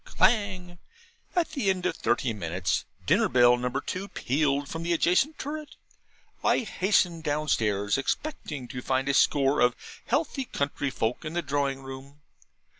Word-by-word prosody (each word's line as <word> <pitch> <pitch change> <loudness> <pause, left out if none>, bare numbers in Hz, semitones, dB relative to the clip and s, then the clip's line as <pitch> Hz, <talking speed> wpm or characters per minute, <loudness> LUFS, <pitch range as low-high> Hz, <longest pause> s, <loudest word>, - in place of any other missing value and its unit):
Clang! 190 - +1 0.6
At 350 -2 +2
the 275 -10 0
end 185 -2 0
of - - 0
thirty 120 0 0
minutes, 90 -2 -1 0.2
dinner - - +3
bell 120 0 +6
number 125 +2 -2
two 185 +7 -4
pealed 140 -3 0
from 165 - -5
the 170 +1 0
adjacent 180 - +2
turret. 300 +1 -6 0.7
I - - +3
hastened 185 -6 +1
downstairs, 115 -9 +1
expecting 145 - -3
to 125 -3 -5
find 130 +1 0
a 140 - +2
score 140 +1 +3
of 125 -1 +4 0.3
healthy 275 0 0
country 145 - -2
folk 120 -2 -2
in 155 0 -5
the 175 0 -1
drawing 140 -1 -1
room. 135 +2 -10
145 Hz, 150 wpm, -27 LUFS, 130-185 Hz, 0.7 s, bell